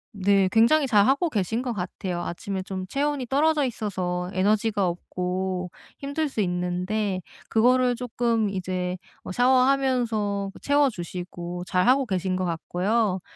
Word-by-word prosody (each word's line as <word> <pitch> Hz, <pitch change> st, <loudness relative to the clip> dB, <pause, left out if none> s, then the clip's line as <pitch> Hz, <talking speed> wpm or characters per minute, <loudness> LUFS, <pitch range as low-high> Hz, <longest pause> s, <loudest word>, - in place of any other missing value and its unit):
네 200 Hz, -1 st, +3 dB
굉장히 235 Hz, +8 st, +4 dB
잘하고 265 Hz, -, +3 dB
계신 225 Hz, -, -1 dB
것 245 Hz, -2 st, -2 dB
같아요. 180 Hz, -2 st, -4 dB
아침에 190 Hz, +3 st, -4 dB
좀 185 Hz, 0 st, -5 dB
체온이 280 Hz, +3 st, -1 dB
떨어져 295 Hz, +3 st, +2 dB
있어서 185 Hz, -6 st, -3 dB
에너지가 205 Hz, +1 st, +2 dB
없고 180 Hz, +1 st, -3 dB, 0.3 s
힘들 285 Hz, +2 st, -2 dB
수 265 Hz, -, -5 dB
있는데 180 Hz, +2 st, -1 dB, 0.3 s
그거를 250 Hz, +2 st, +3 dB
조금 235 Hz, -2 st, 0 dB
이제 185 Hz, -1 st, -2 dB, 0.3 s
어 -, -, -6 dB
샤워하면서 245 Hz, -5 st, +2 dB
그 -, -, -13 dB
채워 285 Hz, -1 st, +3 dB
주시고 175 Hz, -1 st, -6 dB
잘 180 Hz, +1 st, +1 dB
하고 265 Hz, +2 st, +4 dB
계신 185 Hz, -3 st, -1 dB
것 185 Hz, -, -1 dB
같고요. 185 Hz, +4 st, 0 dB
205 Hz, 295 characters per minute, -25 LUFS, 185-250 Hz, 0.3 s, 굉장히